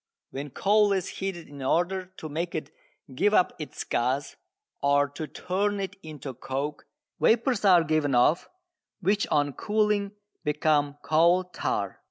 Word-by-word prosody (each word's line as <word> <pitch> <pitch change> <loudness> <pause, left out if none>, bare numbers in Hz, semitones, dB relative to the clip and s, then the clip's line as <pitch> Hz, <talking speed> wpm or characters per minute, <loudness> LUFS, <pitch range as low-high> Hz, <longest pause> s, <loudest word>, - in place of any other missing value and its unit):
When 140 +2 -5
coal 205 +7 +3
is 190 -2 -1
heated 190 -3 -4
in 140 -1 -10
order 175 +7 0
to 155 - -6
make 165 +3 -3
it 155 - -4 0.4
give 205 +11 +2
up 180 - +3
its 155 - -6
gas, 130 +4 -1 0.5
or 145 0 +3
to 150 +2 -6
turn 200 +5 -1
it 195 -1 -4
into 150 -4 -7
coke, 140 +4 -4 0.3
vapours 235 0 +2
are 180 -4 +7
given 155 -3 +1
off 135 +8 +3 0.5
which 200 +3 +1
on 145 -2 +1
cooling 210 - 0 0.3
become 150 -1 +1
coal 170 +4 +4
tar. 180 - -3
165 Hz, 145 wpm, -27 LUFS, 145-195 Hz, 0.5 s, are